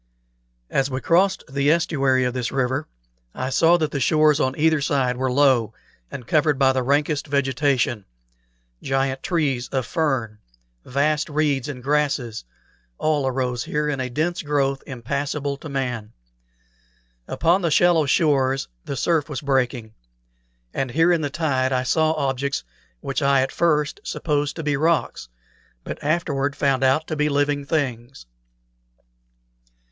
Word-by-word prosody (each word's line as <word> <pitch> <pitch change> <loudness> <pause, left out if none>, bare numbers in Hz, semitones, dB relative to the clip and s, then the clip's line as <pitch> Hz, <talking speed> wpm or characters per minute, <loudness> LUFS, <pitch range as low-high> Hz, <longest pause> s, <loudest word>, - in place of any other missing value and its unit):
As 135 0 +1
we 130 -1 -3
crossed 185 +6 +2
the 140 +1 0
estuary 140 -6 +2
of 125 -1 -1
this 125 -2 -3
river 130 +2 -1 0.5
I 130 +1 -3
saw 165 +5 +4
that 155 -3 -1
the 140 - -2
shores 155 +2 +3
on 130 -2 0
either 155 -1 +2
side 135 -3 +1
were 130 +1 -1
low, 130 -5 +3 0.3
and 125 - -8
covered 150 -1 +2
with 135 -1 +4
the 130 - 0
rankest 145 +3 0
vegetation; 135 -5 0 0.8
giant 135 0 -1
trees 140 -8 -1
of 130 -3 -2
fern, 120 -6 -1 0.4
vast 150 +4 0
reeds 145 -3 0
and 125 -3 -7
grasses, 140 - -1 0.5
all 150 -3 0
arose 125 -2 -2
here 150 0 -1
in 140 -2 -2
a 130 -1 -2
dense 160 +7 -1
growth 140 -2 0
impassable 140 +3 -3
to 155 - -9
man. 125 -6 -3 1.1
Upon 170 +4 +2
the 170 - +1
shallow 165 -1 +3
shores 135 -3 +2 0.2
the 140 - -5
surf 160 +2 +1
was 145 - -4
breaking; 125 -5 -1 0.8
and 135 - -2
here 165 +7 +3
in 170 -2 +2
the 145 - -2
tide 135 -4 0
I 130 -1 +1
saw 155 +4 +2
objects 140 -2 -2 0.4
which 135 - -3
I 140 -1 +3
at 130 - -1
first 150 -3 +1
supposed 145 -2 -2
to 165 - -5
be 150 -1 0
rocks, 160 - 0 0.5
but - - -7
afterward 145 -3 0
found 135 -2 +1
out 135 +4 +3
to 155 - -4
be 150 0 +1
living 145 0 0
things. 135 - -3
140 Hz, 150 wpm, -22 LUFS, 130-150 Hz, 1.1 s, saw